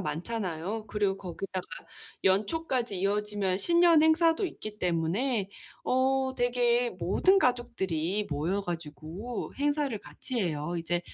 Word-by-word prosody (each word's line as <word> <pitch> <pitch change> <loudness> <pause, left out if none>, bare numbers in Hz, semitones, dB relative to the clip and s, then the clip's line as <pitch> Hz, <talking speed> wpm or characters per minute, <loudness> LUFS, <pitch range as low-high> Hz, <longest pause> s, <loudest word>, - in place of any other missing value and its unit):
많잖아요. 185 +4 -3
그리고 200 -2 0
거기다가 185 0 -5 0.6
연초까지 225 - +1
이어지면 205 -1 0
신년 340 - +5
행사도 325 +3 +4
있기 215 -9 -8
때문에 190 +6 0 0.4
어 265 +1 +2
되게 245 0 +2
모든 375 - +3
가족들이 210 - 0
모여 160 +7 0
가지고 170 +6 -5
행사를 290 -3 +1
같이 250 +3 -5
해요. 165 -2 -2
이제 175 +1 -1
210 Hz, 280 characters per minute, -29 LUFS, 180-255 Hz, 0.6 s, 신년